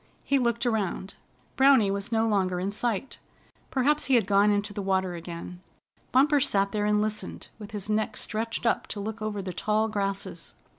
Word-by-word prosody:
He 275 - +2
looked 235 -1 0
around. 205 -4 -1 0.4
Browny 265 -7 +5
was 200 +2 -3
no 225 0 +2
longer 190 -4 +1
in 190 +2 -2
sight. 230 +3 -2 0.5
Perhaps 290 +3 +2
he 270 - +3
had 230 -5 +4
gone 200 +1 +4
into 205 0 0
the 205 - -4
water 190 -1 0
again. 170 +1 -7 0.5
Bumper 285 +3 +4
sat 200 -8 +2
there 210 -1 0
and 210 0 +3
listened, 215 0 -4
with 210 -2 -8
his 210 -3 -5
neck 215 0 -1
stretched 225 +2 -3
up 230 - +1
to 205 - -5
look 215 +2 -5
over 210 -2 -3
the 185 -1 -5
tall 215 +3 +1
grasses. 200 -2 -4
210 Hz, 185 wpm, -27 LUFS, 195-230 Hz, 0.5 s, Browny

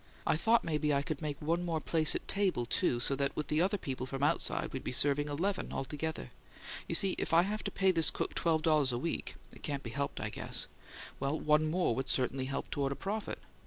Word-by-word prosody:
I - - +3
thought 225 +9 +3
maybe 150 -2 0
I 140 -1 +2
could 150 0 -4
make 150 -3 -3
one 165 +3 0
more 165 -2 -1
place 155 0 +1
at - - -4
table, 190 -11 +1
too, 120 0 +1
so 135 +3 +2
that 140 0 -1
with 150 - -3
the 155 +1 +2
other 195 +3 +2
people 130 -6 -4
from 135 +1 -4
outside 145 - +1
we'd 130 - -4
be - - -3
serving 145 +3 +4
eleven 185 +7 -1
altogether. 150 +4 -4 0.6
You - - 0
see 195 -2 +5
if - - 0
I 170 - +7
have 210 +3 -3
to - - 0
pay 190 0 +3
this 165 -3 +5
cook - - -3
twelve 160 -2 +1
dollars 150 -5 +3
a 120 - -1
week 165 +7 -3 0.2
it - - -14
can't 140 -2 -3
be 115 - -6
helped, 140 +3 -3
I - - -2
guess - - -2 0.5
well, 140 +3 -1
one 155 +1 +3
more 175 -6 +1
would 130 +2 -3
certainly 130 0 +1
help 135 - -4
toward 140 -1 -1
a - - -2
profit. 205 +6 -4
150 Hz, 235 wpm, -32 LUFS, 140-170 Hz, 0.6 s, I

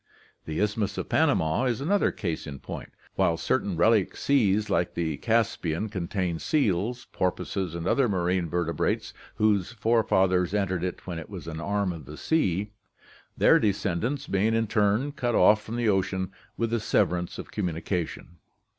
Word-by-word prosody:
The 80 0 -3
Isthmus 105 -1 0
of - - -4
Panama 80 +11 +2
is 125 -2 0
another 195 +9 +2
case 85 -5 -4
in 70 -1 -6
point, - - -8 0.2
while 85 - +2
certain 100 -6 0
relic 105 +2 +3
seas 110 -7 +2
like 90 - 0
the 80 -4 -1
Caspian 110 -5 0
con 95 -5 -4
tain 90 -4 -1
seals, 120 - 0
porpoises, 90 -1 -2
and 85 0 -4
other 130 +5 +2
marine 90 -2 0
vertebrates 85 0 -1 0.2
whose 105 -1 +1
fore 115 0 +2
fathers 95 -1 +2
entered 95 -4 0
it 90 -1 -4
when 85 -3 -4
it 80 - -9
was 95 -5 -8
an 80 -1 -5
arm 100 -1 0
of 80 -4 -9
the 75 +3 -9
sea; 105 - 0 0.7
their - - +6
descendants 105 +7 -1
being 105 +2 +1
in 115 0 +2
turn 105 +6 +1
cut 120 -5 -1
off 105 0 +5
from 110 +2 -6
the 120 -1 0
ocean 95 -1 0 0.3
with 115 -1 -1
the 115 - +1
severance 90 -5 0
of - - -8
communi 85 -6 -3
cation. 85 -1 -3
100 Hz, 170 wpm, -27 LUFS, 85-110 Hz, 0.7 s, their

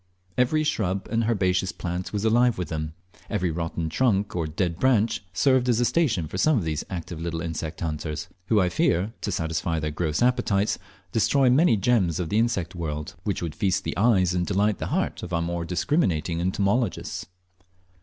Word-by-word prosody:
Every 155 +5 +2
shrub 100 -10 -1
and 115 0 +1
herbaceous 95 -4 +1
plant 90 +1 -4
was 105 +1 -2
alive 120 +2 +4
with 90 - -3
them, 80 -1 -4 0.3
every 90 -1 0
rotten 85 0 -3
trunk 100 +2 +1
or 85 -3 -1
dead 85 +1 -2
branch 115 -5 +2
served 125 +5 +3
as 120 -1 +3
a 120 - +3
station 115 - +1
for 95 - -5
some 155 +3 +4
of 105 - 0
these 80 -2 -2
active 85 -2 -5
little 85 -1 -3
insect 80 -1 -4
hunters, 75 -1 -3 0.2
who, 110 - +4
I 90 - +3
fear, 90 +4 +1
to 100 - -2
satisfy 80 -1 -1
their 75 0 -2
gross 80 +5 0
appetites, 120 -5 +1 0.3
destroy 130 +4 +3
many 130 -3 +4
gems 100 -7 +2
of 85 -3 -2
the 105 - +2
insect 115 -8 0
world, 75 -3 -4
which 100 -4 -1
would 80 -3 -3
feast 95 -1 0
the - - -3
eyes 95 -4 +3
and 90 -1 +1
delight 100 +2 +1
the - - -3
heart - - -1
of 90 - -6
our 85 - +2
more 85 0 -2
discriminating 90 - 0
entomologists. 100 +6 -1
95 Hz, 185 wpm, -25 LUFS, 85-115 Hz, 0.3 s, alive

